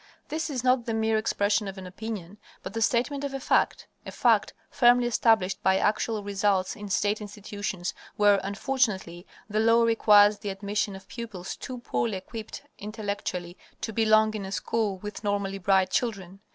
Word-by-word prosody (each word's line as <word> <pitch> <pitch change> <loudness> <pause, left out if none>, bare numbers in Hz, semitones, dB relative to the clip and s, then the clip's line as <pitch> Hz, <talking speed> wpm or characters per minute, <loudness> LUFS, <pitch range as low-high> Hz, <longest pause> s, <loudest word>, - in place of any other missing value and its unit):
_ - - -39
This 315 +1 -2
is 255 -4 -3
not 255 -1 +2
the 225 - -1
mere 220 0 +1
expression 205 -1 +1
of 195 0 -7
an 190 - -8
opinion, 200 0 -7 0.2
but - - -6
the 225 - -3
statement 255 +5 +1
of 280 -1 -3
a - - -3
fact; - - +1 0.2
a - - -8
fact - - +2 0.2
firmly 245 0 +5
established 220 -5 +2
by 190 0 +3
actual 215 +1 0
results 200 0 0
in 205 -3 -8
state 205 +2 +1
institutions 205 -3 -5 0.2
where, 205 -1 +5
unfortunately, 200 -5 -1 0.2
the 215 0 -1
law 230 +1 +5
requires 210 -2 +5
the 205 - -4
admission 200 +1 -2
of 190 0 -12
pupils 220 -7 -6
too 255 - -7
poorly 235 -3 -2
equipped 220 +3 -8 0.2
intellectually 200 -4 -5 0.2
to 220 - -4
belong 215 0 +4
in 210 -2 -4
a 190 - -6
school 210 -1 -1
with 210 +2 -8
normally 200 -1 -1
bright 190 0 +2
children. 195 -6 -2
210 Hz, 175 wpm, -27 LUFS, 195-225 Hz, 0.2 s, firmly